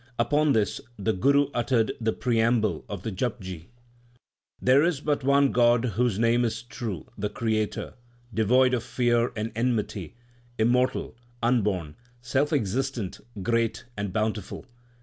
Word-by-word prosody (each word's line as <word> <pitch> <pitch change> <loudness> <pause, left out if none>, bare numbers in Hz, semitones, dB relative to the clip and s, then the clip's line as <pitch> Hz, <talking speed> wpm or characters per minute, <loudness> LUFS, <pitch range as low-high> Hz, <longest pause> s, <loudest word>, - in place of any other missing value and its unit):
Upon 145 +5 +2
this, 105 -5 0 0.2
the 110 +2 0
Guru 140 +8 +3
uttered 120 -2 +1
the 110 0 +1
preamble 115 -7 +1
of 100 -2 -6
the 110 - -3
Japji: 95 -6 -4 0.9
There 130 +3 +5
is 170 -4 +1
but 145 -1 -1
one 140 0 +4
God 120 0 +4
whose 120 -3 0
name 115 +2 +3
is 115 -1 -2
True, 115 - -6
the 105 +1 -1
Creator, 110 -1 -2 0.4
devoid 125 +5 +3
of 120 - +1
fear 120 -1 +1
and 110 +1 -3
enmity, 115 -6 -1 0.4
immortal, 125 +3 +1 0.3
unborn, 100 -10 0 0.2
self 135 +5 0
existent, 125 - -1 0.2
great, 115 0 0
and 100 -2 -3
bountiful. 110 +2 -2
115 Hz, 130 wpm, -26 LUFS, 105-125 Hz, 0.9 s, There